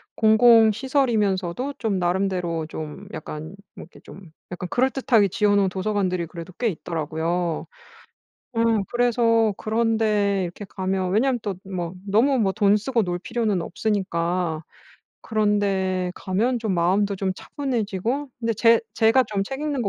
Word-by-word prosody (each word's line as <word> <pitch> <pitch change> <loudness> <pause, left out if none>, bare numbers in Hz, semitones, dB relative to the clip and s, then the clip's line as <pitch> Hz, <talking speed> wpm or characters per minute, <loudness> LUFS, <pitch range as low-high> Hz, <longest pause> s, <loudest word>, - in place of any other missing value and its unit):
공공시설이면서도 225 -1 +3
좀 210 -5 -1
나름대로 175 -2 -1
좀 155 -2 -7
약간 155 +3 -7 0.2
뭐 - - -9
이렇게 - - -16
좀 180 -4 -13 0.2
약간 180 0 -5
그럴듯하게 250 -4 +2
지어 205 +1 +2
놓은 195 -2 +3
도서관들이 185 -2 -1
그래도 170 +2 -9
꽤 240 - 0
있더라고요. 165 0 -3 0.9
어 230 - -2 0.3
그래서 230 -3 +2
그런 225 +1 0
데 205 -3 +1
이렇게 180 +4 -6
가면 190 -1 -2
왜냐하면 245 +4 +2
또 200 -3 -3
뭐 180 -2 -4
너무 250 +7 +3
뭐 195 -3 +2
돈 205 0 +3
쓰고 230 +1 0
놀 175 -1 -3
필요는 225 -4 -1
없으니까 175 -5 -1 0.6
그런 210 -2 +1
데 190 -2 0
가면 230 +7 0
좀 220 -4 -2
마음도 195 +4 +2
좀 190 -1 -1
차분해지고 250 0 -3
근데 230 0 0
제 230 +1 +5
제가 225 +3 +4
좀 200 -2 -2
책 270 +6 -6
읽는 295 -4 -2
거 200 - 0
200 Hz, 310 characters per minute, -23 LUFS, 180-230 Hz, 0.9 s, 제